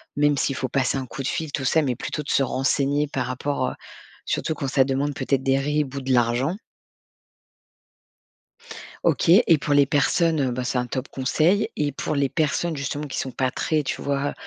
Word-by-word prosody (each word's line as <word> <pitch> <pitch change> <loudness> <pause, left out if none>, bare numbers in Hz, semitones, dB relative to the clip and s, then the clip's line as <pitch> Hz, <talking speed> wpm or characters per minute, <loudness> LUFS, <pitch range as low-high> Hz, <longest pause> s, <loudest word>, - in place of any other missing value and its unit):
même 145 -1 +3
s'il 135 - 0
faut 130 - -2
passer 130 +1 +1
un 130 - -6
coup 135 - -6
de - - -2
fil, 160 -1 -3
tout 140 -2 -3
ça, 160 +5 +3
mais 130 -5 -1
plutôt 150 - -4
de 140 - -9
se 140 - +3
renseigner 140 +3 +1
par 135 -3 -2
rapport, 140 +3 -2
heu - - -6 0.5
surtout 160 - -1
quand 145 -2 -4
ça 135 0 +3
demande 135 +2 -1
peut-être 135 -2 0
des 135 0 +2
RIB 145 0 -1
ou 140 - -3
de 130 0 -3
l'argent. 120 +6 +2 2.5
OK - - +2 0.2
et 165 - +5
pour 145 +1 0
les 145 -1 +6
personnes, 155 +3 +2
heu,- 130 -2 0
bah, 125 +1 -3
c'est 125 0 -1
un 125 - -2
top 130 +2 -4
conseil- 165 +10 +1
et 145 -1 0
pour 145 +2 -3
les 140 -1 +2
personnes 160 +3 -1
justement, 145 +1 -3
qui 140 - -4
sont 130 - -3
pas 130 0 -1
très, 155 +3 0
tu - - -3
vois, 140 0 -1
140 Hz, 205 wpm, -24 LUFS, 130-150 Hz, 2.5 s, les